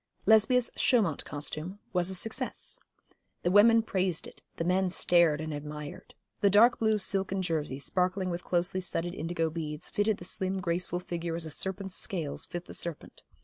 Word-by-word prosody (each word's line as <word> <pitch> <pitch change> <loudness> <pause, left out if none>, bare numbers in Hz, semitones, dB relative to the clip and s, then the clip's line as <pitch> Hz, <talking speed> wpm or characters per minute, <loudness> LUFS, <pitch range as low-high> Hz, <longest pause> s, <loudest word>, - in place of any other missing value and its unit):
Lesbia's 225 +3 +4
Chaumount 205 - +2
costume 155 +5 -4 0.2
was 180 0 +1
a 190 - -4
success. 220 +4 -3 0.6
The 175 - +2
women 225 +3 +6
praised 185 -5 -1
it, - - -12
the - - -2
men 185 +2 +2
stared 170 -4 +4
and 155 0 -4
admired. 150 0 -8 0.2
The 200 - +4
dark 220 +5 +5
blue 220 -1 +2
silken 195 -1 +1
jersey, 155 -6 -2
sparkling 185 +5 0
with 175 +1 -4
closely 180 +1 0
studded 175 -1 -2
indigo 165 -1 -2
beads, 150 -2 -5
fitted 205 0 +1
the 175 - -6
slim 190 +1 -1
graceful 175 0 -2
figure 170 -2 -4
as 165 -1 -3
a 160 - -3
serpent's 190 +3 -2
scales 165 -7 -2
fit 175 0 -6
the - - -9
serpent. 170 -3 -4
180 Hz, 170 wpm, -29 LUFS, 165-195 Hz, 0.6 s, women